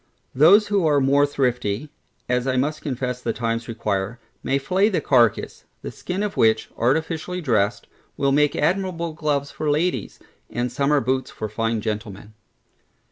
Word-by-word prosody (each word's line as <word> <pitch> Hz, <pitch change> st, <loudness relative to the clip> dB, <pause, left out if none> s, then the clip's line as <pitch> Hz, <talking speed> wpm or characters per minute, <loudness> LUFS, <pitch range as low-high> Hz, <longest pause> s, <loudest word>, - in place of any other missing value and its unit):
Those 185 Hz, +11 st, +6 dB
who 200 Hz, -5 st, +2 dB
are 145 Hz, -2 st, +3 dB
more 140 Hz, +2 st, +3 dB
thrifty 125 Hz, -1 st, -1 dB, 0.4 s
(as 125 Hz, +1 st, 0 dB
I 130 Hz, -1 st, +1 dB
must 150 Hz, +4 st, -1 dB
confess 125 Hz, -3 st, -3 dB
the 115 Hz, -, -2 dB
times 115 Hz, 0 st, -2 dB
require) 110 Hz, -1 st, -3 dB, 0.2 s
may 135 Hz, +2 st, 0 dB
flay 185 Hz, +10 st, +2 dB
the 195 Hz, -, 0 dB
carcass; 120 Hz, -6 st, +1 dB, 0.2 s
the -, -, -5 dB
skin 185 Hz, +3 st, -4 dB
of 205 Hz, -1 st, -3 dB
which, 110 Hz, 0 st, +2 dB
artificially 160 Hz, +8 st, -1 dB
dressed, 110 Hz, -, 0 dB, 0.3 s
will 140 Hz, -1 st, +1 dB
make 150 Hz, +1 st, +3 dB
admirable 170 Hz, 0 st, -1 dB
gloves 145 Hz, -3 st, -1 dB
for 155 Hz, -, -3 dB
ladies, 160 Hz, +5 st, -1 dB, 0.3 s
and 120 Hz, 0 st, -2 dB
summer 140 Hz, +3 st, +2 dB
boots 130 Hz, +2 st, -1 dB
for 110 Hz, -, -5 dB
fine 115 Hz, +1 st, -1 dB
gentlemen. 105 Hz, -1 st, -5 dB
135 Hz, 155 wpm, -22 LUFS, 115-155 Hz, 0.4 s, Those